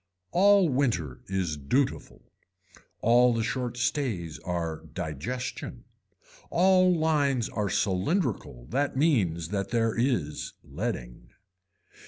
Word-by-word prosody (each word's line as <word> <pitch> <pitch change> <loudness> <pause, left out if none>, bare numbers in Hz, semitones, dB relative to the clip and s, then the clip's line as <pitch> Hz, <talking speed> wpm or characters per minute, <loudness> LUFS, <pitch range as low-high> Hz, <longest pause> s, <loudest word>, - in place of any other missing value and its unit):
All 200 0 +5
winter 120 - 0
is 95 -5 -1
dutiful. 125 - -1 0.8
All 120 +1 +5
the 115 - 0
short 125 0 -2
stays 120 - -1
are 85 -3 -3
digestion. 120 - -5 0.6
All 185 +1 +4
lines 145 -6 +1
are 105 -1 -2
cylindrical 100 - -1
that 140 +1 0
means 95 - +1
that 100 -1 -2
there 115 -1 +1
is 115 - -1
leading. - - -5
115 Hz, 100 wpm, -28 LUFS, 85-140 Hz, 0.8 s, All